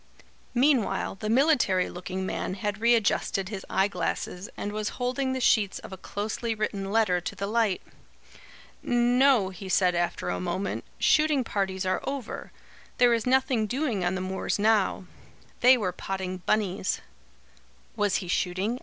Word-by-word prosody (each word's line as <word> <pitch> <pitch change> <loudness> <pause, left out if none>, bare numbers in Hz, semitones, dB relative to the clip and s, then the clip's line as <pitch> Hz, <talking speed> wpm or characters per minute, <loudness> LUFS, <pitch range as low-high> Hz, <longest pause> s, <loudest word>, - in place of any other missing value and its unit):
Meanwhile 245 -7 +2
the 215 - -2
military 235 - +3
looking 185 +1 -5
man 185 - -3
had 205 +2 -3
readjusted 225 -4 +2
his 200 -3 -6
eye 190 +1 +2
glasses 180 - -3
and 205 - -3
was 215 0 -2
holding 260 +1 -1
the 260 - -2
sheets 215 -5 +3
of - - -10
a - - -4
closely 215 +4 -3
written 200 -2 -3
letter 205 -5 +2
to - - -5
the 200 - -3
light. 215 -2 +1 1.0
"No," 245 -2 +3
he 190 +1 -9
said 180 -1 +3
after 175 0 -1
a - - -2
moment, 180 +2 -3
"shooting 305 -3 +3
parties 190 -3 -2
are 185 0 0
over. 275 -4 -5 0.5
There 245 -1 +5
is 230 +1 -1
nothing 255 -4 +2
doing 245 -5 -1
on 175 +1 0
the 185 - -3
moors 190 +1 -2
now. 210 -2 +2 0.5
They 255 +1 +7
were 195 -6 -1
potting 185 0 -4
bunnies." 200 -3 0 1.0
"Was 205 -3 +1
he 185 - -2
shooting?" 190 +7 -1
205 Hz, 155 wpm, -27 LUFS, 190-240 Hz, 1.0 s, They